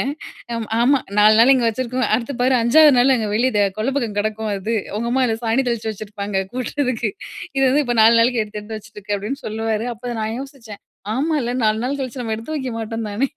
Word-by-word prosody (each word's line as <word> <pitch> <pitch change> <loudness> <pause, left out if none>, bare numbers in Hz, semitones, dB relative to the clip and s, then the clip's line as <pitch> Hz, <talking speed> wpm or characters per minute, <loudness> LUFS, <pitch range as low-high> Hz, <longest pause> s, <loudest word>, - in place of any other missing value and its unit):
சொல்லுவேன். 270 - -1 0.5
அம் 230 -1 -3
ஆமா 270 +4 +4 0.2
4 215 +1 +6
நாள் 245 +4 +7
இங்க 255 -3 +2
வச்சிருக்குவ 255 +2 -1
அடுத்து 235 +4 -2
பாரு 255 +1 +3
5வது 300 +6 +6
நாள் 255 +2 +5
அங்க 220 -4 -1
வெளிய 225 -3 +2
கொள்ள 220 +5 -1
பக்கம் 230 -6 -2
கிடக்கும். 215 +1 -2
அது. 205 +4 -3 0.2
உங்க 235 +2 -2
அம்மா 260 +2 +2
'இத 225 - 0
சாணி 230 +4 +2
தெளிச்சு 230 -2 -2
வச்சிருப்பாங்க 200 -2 -4
கூட்டுறதுக்கு. 255 -2 -2 0.5
இது 270 - +2
வந்து 290 +3 +3
இப்போ 245 - -1
4 225 +2 +7
நாளைக்கு 235 0 +3
எடுத்து 210 0 -7
எடுத்து 220 +1 -7
வச்சுட்ருக்க" 205 0 -6
அப்படின்னு 210 +8 -4
சொல்லுவாரு. 220 +1 -2
அப்போ 240 +2 -6
நான் 220 +1 -2
யோசிச்சேன் 260 -7 -10 0.3
ஆமால்ல 275 -3 0
4 215 0 +2
நாள் 280 +3 -1
கழிச்சு 260 -1 -5
நம்ம 225 -2 -2
எடுத்து 230 +8 -6
வைக்க 260 -3 -4
மாட்டோம் 225 -1 -4
தானே! 235 +7 0
230 Hz, 205 wpm, -20 LUFS, 215-255 Hz, 0.5 s, நாள்